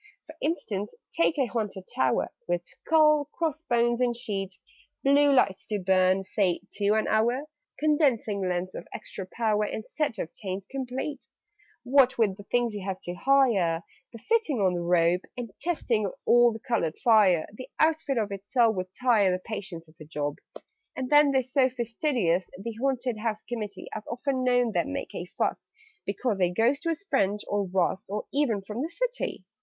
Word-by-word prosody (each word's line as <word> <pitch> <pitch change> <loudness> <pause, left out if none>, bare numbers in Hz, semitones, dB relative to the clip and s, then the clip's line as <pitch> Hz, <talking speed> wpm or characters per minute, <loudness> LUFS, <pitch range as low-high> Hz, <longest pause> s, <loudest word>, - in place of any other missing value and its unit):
"For 315 - -12
instance, 210 - -2 0.2
take 335 -1 +2
a 270 - +3
Haunted 210 -5 -4
Tower, 130 -1 +1 0.2
With 175 0 -1
skull, 305 -2 +3
cross 315 +1 -3
bones, 240 -3 +1
and 245 -1 +2
sheet; 195 -6 -4 0.5
Blue 285 +1 +5
lights 200 -8 +2
to 210 - -1
burn 185 0 +3
(say) 190 -2 0
two 205 +1 +2
an 220 - +1
hour, 235 +5 +2 0.3
Condensing 275 -9 +2
lens 185 0 -2
of - - -8
extra 195 -3 -7
power, 215 0 0
And 215 +1 -4
set 295 -7 -2
of 165 -3 -5
chains 190 -2 -5
complete: 265 +3 -5 0.6
"What 260 0 +4
with 210 -5 +2
the 205 - -11
things 240 0 0
you 205 -2 -5
have 190 -1 -3
to 175 - -5
hire 200 -9 +3 0.3
The 235 - -9
fitting 380 - 0
on 190 -2 +3
the 175 - -2
robe 170 0 +3 0.2
And 235 -3 -5
testing 230 - 0
all 240 0 +6
the 220 - -5
coloured 225 - -1
fire 205 -8 +4
The 255 +4 -9
outfit 315 -4 +2
of 210 -3 0
itself 220 +3 +1
would 185 0 -2
tire 230 -6 +4
The 180 - +1
patience 185 -4 -7
of 155 0 -22
a - - -8
Job! 145 -1 -3 0.6
"And 260 +1 -4
then 295 0 +7
they're 265 -1 +2
so 260 +1 +2
fastidious, 235 - 0
The 225 +5 -5
Haunted 255 -3 0
House 215 -1 -2
Committee: 210 -5 -6
I've 215 - -4
often 255 +2 -1
known 245 -2 +3
them - - -1
make - - -5
a - - -5
fuss - - -2 0.4
Because 200 0 -1
a 180 - +4
Ghost 245 - +1
was 330 +3 -1
French, 205 - +1
or 205 -1 0
Russ, 185 0 0
Or 210 +1 -3
even 245 -9 +1
from 210 +5 -5
the 315 - -2
City! - - -3
225 Hz, 180 wpm, -27 LUFS, 195-265 Hz, 0.6 s, then